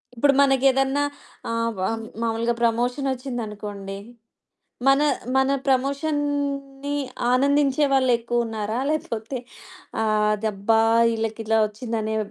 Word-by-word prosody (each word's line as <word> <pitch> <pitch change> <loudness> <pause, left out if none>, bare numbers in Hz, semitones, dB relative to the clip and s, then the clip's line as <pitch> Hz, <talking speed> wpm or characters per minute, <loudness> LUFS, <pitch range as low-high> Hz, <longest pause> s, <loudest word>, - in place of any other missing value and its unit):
ఇప్పుడు 275 +4 +4
మనకేదన్నా 270 0 +3 0.5
ఆహ్, 230 0 0
వ - - -4 0.4
మామూలుగా 230 +1 0
ప్రమోషన్ 245 +4 +1
ఒచ్చిందనుకోండి. 210 -6 -6 0.9
మన, 275 +1 +5 0.3
మన 265 0 +3 0.2
ప్రమోషన్‌ని 280 0 -1 0.4
ఆనందించే 280 +2 +3
వాళ్ళెక్కువున్నారా? 235 -3 0
లేకపోతే 255 -5 -3 0.7
ఆదబ్బా! 215 0 +1 0.3
ఇళ్ళకిలా 225 0 0
ఒచ్చిందనే 220 0 -3
240 Hz, 80 wpm, -23 LUFS, 225-275 Hz, 0.9 s, మన